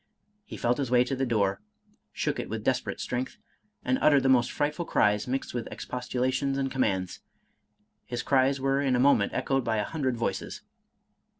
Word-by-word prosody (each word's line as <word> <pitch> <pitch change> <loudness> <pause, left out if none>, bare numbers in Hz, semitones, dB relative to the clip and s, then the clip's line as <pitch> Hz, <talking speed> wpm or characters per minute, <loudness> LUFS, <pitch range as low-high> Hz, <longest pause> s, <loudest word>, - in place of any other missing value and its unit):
He - - -8
felt 120 +3 +1
his 135 -4 -1
way 125 0 +5
to 135 +2 -3
the 135 0 -1
door, 100 -4 +1 0.5
shook - - -2
it - - -4
with - - -4
desperate - - -1
strength, 125 +1 -3 0.5
and 260 - +1
uttered 145 -3 +5
the 135 - +3
most 125 -2 +4
frightful 150 +3 -1
cries, 105 -8 +2
mixed 130 +2 -3
with 120 -2 -3
expostulations 130 +2 -2
and 135 -1 -1
commands. 95 -9 -1 0.9
His 120 -1 -3
cries 135 +1 +2
were 135 +1 +1
in 135 -3 +2
a - - +1
moment 125 -6 +4
echoed 135 -1 0
by 110 -1 0
a 105 - +1
hundred 130 -2 -2
voices. 115 - -3
130 Hz, 180 wpm, -28 LUFS, 120-135 Hz, 0.9 s, way